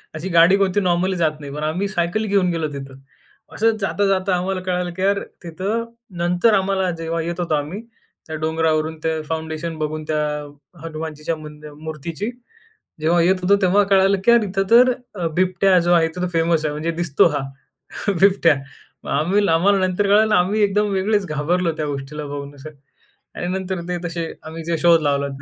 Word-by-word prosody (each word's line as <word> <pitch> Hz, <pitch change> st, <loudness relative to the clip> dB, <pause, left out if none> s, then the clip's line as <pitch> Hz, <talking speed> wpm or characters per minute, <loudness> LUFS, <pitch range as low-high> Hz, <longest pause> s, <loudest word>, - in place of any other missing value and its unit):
अशी 165 Hz, +5 st, -5 dB
गाडी 170 Hz, +2 st, +6 dB
कोणती 195 Hz, 0 st, +1 dB
नॉर्मली 185 Hz, +1 st, +1 dB
जात 155 Hz, -2 st, 0 dB
नाही 145 Hz, -1 st, -8 dB
पण 150 Hz, -, -5 dB
आम्ही 175 Hz, +6 st, -1 dB
सायकल 180 Hz, +3 st, -1 dB
घेऊन 195 Hz, -3 st, +2 dB
गेलो 165 Hz, -2 st, -1 dB
तिथं. 135 Hz, -1 st, -8 dB, 0.6 s
असं 225 Hz, 0 st, +2 dB
जाता-जाता 195 Hz, -1 st, +1 dB
आम्हाला 185 Hz, +1 st, -2 dB
कळालं. 180 Hz, -1 st, -2 dB
की 185 Hz, -, -7 dB
यार 200 Hz, +1 st, +2 dB, 0.2 s
तिथं 195 Hz, +8 st, -3 dB, 0.4 s
नंतर 180 Hz, +6 st, +3 dB
आम्हाला 190 Hz, -1 st, +1 dB
जेव्हा 165 Hz, 0 st, -2 dB
येत 170 Hz, +1 st, -4 dB
होतो 165 Hz, -3 st, 0 dB
आम्ही 150 Hz, +7 st, -3 dB, 0.5 s
त्या 160 Hz, -, -5 dB
डोंगरावरून 160 Hz, 0 st, 0 dB
ते 160 Hz, -1 st, -1 dB
फाउंडेशन 160 Hz, 0 st, -4 dB
बघून 155 Hz, 0 st, -3 dB
त्या 150 Hz, 0 st, +1 dB, 0.6 s
हनुमानजीच्या 160 Hz, 0 st, -4 dB
मंदि 150 Hz, 0 st, -11 dB
मूर्तीची. 160 Hz, +6 st, -5 dB, 0.7 s
जेव्हा 170 Hz, +2 st, +3 dB
येत 185 Hz, +3 st, +4 dB
होतो 200 Hz, +2 st, +5 dB
तेव्हा 195 Hz, +2 st, +4 dB
कळालं, 195 Hz, 0 st, +4 dB
की 235 Hz, -, +6 dB
यार 235 Hz, -, +6 dB
इथं 195 Hz, 0 st, -1 dB
तर 250 Hz, +2 st, +7 dB, 0.4 s
बिबट्या 185 Hz, +1 st, +3 dB
जो 175 Hz, -, +4 dB
आहे 165 Hz, -1 st, +4 dB
इथे 180 Hz, +2 st, -3 dB
फेमस 165 Hz, -1 st, +1 dB
आहे 150 Hz, -, 0 dB
म्हणजे 155 Hz, +3 st, -2 dB
दिसतो 170 Hz, -1 st, +3 dB
हा -, -, -2 dB, 0.8 s
बिबट्या. 190 Hz, -6 st, +4 dB, 0.5 s
मग -, -, -8 dB
आम्ही 195 Hz, +6 st, +2 dB
आम्हाला 195 Hz, +5 st, +3 dB
नंतर 190 Hz, +3 st, 0 dB
कळालं 210 Hz, +1 st, +4 dB
आम्ही 195 Hz, +4 st, +2 dB
एकदम 205 Hz, +1 st, +2 dB
वेगळेच 205 Hz, +1 st, +1 dB
घाबरलो 165 Hz, +4 st, 0 dB
त्या 155 Hz, -1 st, -2 dB
गोष्टीला 145 Hz, +2 st, -5 dB
बघून 145 Hz, 0 st, -7 dB
असं. 140 Hz, +3 st, -10 dB, 0.7 s
आणि 175 Hz, -, -4 dB
नंतर 190 Hz, -1 st, -4 dB
ते 180 Hz, -, -1 dB
तसे 165 Hz, -1 st, -4 dB
आम्ही 160 Hz, +1 st, -8 dB
जे 170 Hz, -1 st, -1 dB
शोध 170 Hz, -1 st, +5 dB
लावला. 140 Hz, -1 st, 0 dB
175 Hz, 175 wpm, -21 LUFS, 155-195 Hz, 0.8 s, तर